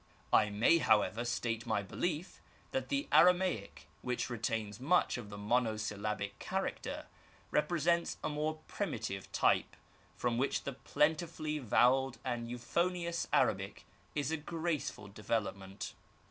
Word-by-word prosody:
I 105 - +6
may, 115 +11 +4
however, 110 -2 +3
state 120 -1 -2
my 105 -3 +1
belief 165 - -3 0.3
that 265 - -2
the 280 +1 0
Ara 180 +1 +8
maic, 175 - -3 0.2
which 125 0 -2
retains 110 -2 -2
much 165 +8 +3
of 120 -4 -6
the 100 - -7
monosyllabic 105 -2 -1
character, - - -3 0.5
repre 160 +3 +1
sents 170 +2 +2
a - - +1
more 155 +1 -2
primitive - - -3
type, - - +2 0.4
from 120 -1 0
which 135 - 0
the 140 - -3
plentifully 155 +2 0
vowelled 130 +1 +3
and 120 -2 -2
euphonious 170 +7 -1
Arabic - - +1 0.3
is 145 0 0
a 160 - +1
graceful 160 -8 -3
development. 100 -2 -3
125 Hz, 130 wpm, -34 LUFS, 110-160 Hz, 0.5 s, Ara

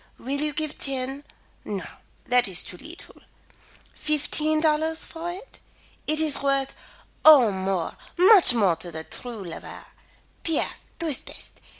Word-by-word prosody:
Will 280 +3 -3
you 300 0 0
give 305 +1 -4
ten 270 +1 -3 0.4
no, 200 -3 -5 0.4
that 245 -2 +3
is 180 -2 -2
too - - -7
leetle 330 - -11 0.8
fifteen 305 +1 0
dollars 315 +1 +1
for 335 +1 -6
it? 385 +8 -10 0.5
It 310 0 +2
is 310 -3 +2
worth 275 -1 0 0.5
Oh, 275 -8 +8
more, 190 -2 -2 0.2
much 370 - +7
more 195 -7 +3
to 175 - -8
the 160 0 -6
true 230 +3 -7
lover. 170 -3 -9 0.6
Pierre, 325 -2 0 0.2
tu 335 - -4
es 300 -5 +2
bete. - - -14
280 Hz, 140 wpm, -25 LUFS, 230-315 Hz, 0.8 s, Oh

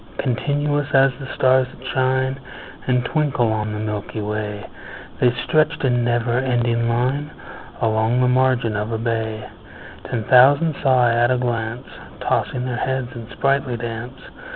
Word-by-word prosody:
Continuous 145 +3 -1
as 135 0 +5
the 135 -2 -7
stars 130 0 +3
that 130 0 -12
shine 130 +1 0 0.5
And 125 -1 +1
twinkle 140 -7 +1
on 110 -1 -2
the 105 - -4
milky 105 0 -4
way, 105 -1 -4 0.5
The 125 - +4
stretched 155 -1 +1
in 120 -2 +2
never 120 0 +1
ending 120 -2 0
line 130 +5 0 0.5
Along 110 +2 +1
the 125 - +3
margin 125 -3 +2
of 105 +2 -3
a 115 - -1
bay: 110 -1 -3 0.6
Ten 115 -3 -2
thousand 140 +7 +5
saw 130 -3 +4
I 115 - +3
at 120 +1 +3
a 130 - +2
glance, 115 -1 -3 0.3
Tossing 125 -1 -1
their 125 -2 -3
heads 130 -1 -2
in 115 -1 -9
sprightly 135 -2 0
dance. 120 +2 -6
125 Hz, 155 wpm, -21 LUFS, 115-130 Hz, 0.6 s, as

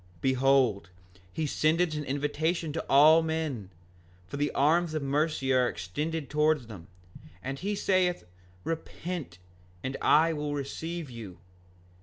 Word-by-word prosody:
5:33 85 - -27
Behold, 130 -7 +2 0.4
he 160 - -2
sendeth 160 +3 +1
an 150 -1 -3
invitation 150 +4 -1
unto 155 +2 -3
all 155 +4 +7
men, 160 - -3 0.6
for 115 - -7
the 145 +1 +1
arms 160 +3 +2
of 155 - -1
mercy 140 -1 0
are 125 -1 +3
extended 150 - -4
towards 150 -2 +2
them, 100 -7 -11 0.6
and 135 +1 -4
he 205 +2 -2
saith: 185 -3 +1 0.4
Repent, 165 - -5 0.5
and 130 +1 -3
I 160 +2 +4
will 150 -1 -3
receive 160 +2 -5
you. 110 -7 -9
150 Hz, 135 wpm, -29 LUFS, 135-160 Hz, 0.6 s, all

